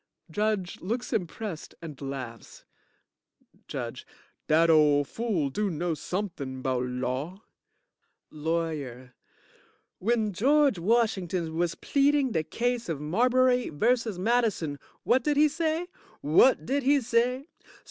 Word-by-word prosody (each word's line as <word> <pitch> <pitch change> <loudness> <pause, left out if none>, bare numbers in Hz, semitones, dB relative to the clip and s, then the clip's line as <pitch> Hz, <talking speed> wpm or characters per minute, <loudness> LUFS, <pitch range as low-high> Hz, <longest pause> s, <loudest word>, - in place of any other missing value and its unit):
(JUDGE 205 -1 -1
looks 235 +7 -3
impressed 190 -3 -4
and 155 -5 -9
laughs) 130 -4 -7 1.0
JUDGE - - -5 0.4
Dat 165 +2 +4
ole 150 -2 +5
fool 175 - -2
do 210 +7 -1
know 170 0 -2
somethin' 155 -7 -4
'bout 125 -1 0
law. 130 - -4 0.9
LAWYER 150 -6 -3 0.9
When 220 0 0
George 275 +1 +3
Washington 185 -5 0
was 170 0 0
pleading 280 -2 +2
de 160 - +1
case 240 +6 -2
of 160 -4 -2
Marbury 250 - +2
vs. 225 +5 +1
Madison, 200 -8 0 0.2
what 250 +1 +3
did 295 0 +1
he 305 +1 +6
say? 320 +2 -1 0.4
What 160 - +4
did 280 +3 0
he 280 +2 +4
say? 250 +4 0
190 Hz, 115 wpm, -27 LUFS, 155-245 Hz, 1.0 s, he